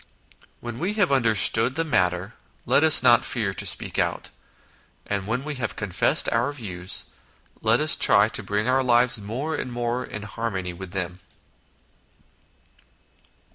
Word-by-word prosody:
When 120 0 -7
we 190 +7 -2
have 200 -7 +1
understood 115 -1 +3
the 165 - 0
matter, 90 - -1 0.3
let 145 - +2
us 160 -5 +6
not 120 -2 +5
fear 110 -6 -2
to - - -5
speak - - 0
out; - - -2 0.7
and 100 -1 -4
when 120 +4 -2
we 150 +1 -5
have 115 - -3
confessed 100 -4 +1
our 120 +5 0
views, 95 -10 -3 0.6
let 115 +2 +2
us 155 0 +5
try 100 +1 +4
to 110 - -4
bring 105 +2 -2
our 130 +1 +2
lives 120 -2 +2
more 125 +10 -5
and 125 - -5
more 120 +1 -3
in 105 -3 -8
harmony 100 -4 -5
with 95 +1 -9
them. 90 -1 -4
115 Hz, 150 wpm, -23 LUFS, 100-130 Hz, 0.7 s, us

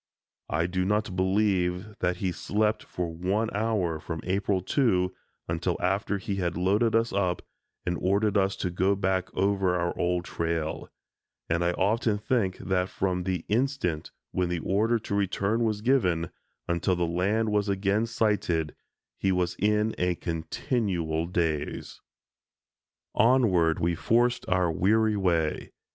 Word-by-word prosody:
I 80 +2 +1
do 90 +1 -1
not 105 0 0
believe 95 0 +1
that 90 -4 0
he 95 -1 -1
slept 105 +4 0
for 85 -2 -4
one 95 +7 0
hour 100 -7 0
from 80 -1 -5
April 95 0 0
2 95 -8 +2 0.3
until 80 0 -1
after 100 - 0
he 100 +1 -4
had 85 -3 -1
loaded 105 +6 +2
us 115 +1 +2
up 90 -3 0 0.4
and 90 -1 -1
ordered 100 +2 +2
us 95 -1 +2
to 90 - -3
go 95 +3 +2
back 95 -1 -1
over 95 -1 +2
our 85 -1 -1
old 90 0 0
trail, 85 -2 -3 0.6
and 85 +1 +1
I 85 0 +1
often 105 +3 +1
think 105 -4 0
that 95 -1 -1
from 90 -2 -1
the 90 -3 -2
instant 110 - 0 0.2
when 90 -1 0
the 90 - -1
order 110 +7 +2
to 105 - -6
return 100 +3 +1
was 105 -2 -1
given 90 -10 +1 0.4
until 85 +2 +1
the 85 0 0
land 100 +6 +1
was 105 -1 +1
again 100 +3 +1
sighted, 90 -9 0 0.4
he 95 - +2
was 90 -1 0
in 105 +2 +2
a 90 0 +1
continual 85 -2 -2
daze. 80 -4 -2 1.1
Onward 100 -10 +4
we 85 +1 +1
forced 120 +8 +1
our 90 -2 +2
weary 105 +6 +2
way. 85 -6 0
95 Hz, 145 wpm, -27 LUFS, 85-105 Hz, 1.1 s, Onward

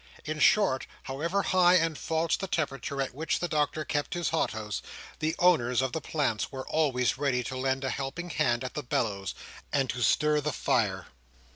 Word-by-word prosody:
In 155 0 -3
short, 150 -8 +4 0.2
however 170 +9 -1
high 180 -1 +5
and 165 -3 +2
false 160 +2 0
the 195 - -4
temperature 140 -4 -2
at 130 - -6
which 160 +4 -1
the 175 - -2
Doctor 155 -1 0
kept 145 +3 -2
his 175 -1 0
hothouse, 110 -9 -2 0.4
the 155 +1 0
owners 125 -9 +3
of 130 -1 +1
the 160 - -3
plants 140 -8 -1
were 130 -1 -6
always 135 -5 +1
ready 130 -4 +1
to 130 - -5
lend 130 +1 -1
a 130 - -1
helping 165 +6 -4
hand 120 0 +1
at 130 - -5
the 150 - -3
bellows, 105 -6 -2 0.4
and 135 -2 +1
to 125 - -5
stir 150 +5 +3
the 150 +1 -2
fire. 95 -6 0
140 Hz, 185 wpm, -29 LUFS, 125-160 Hz, 0.4 s, high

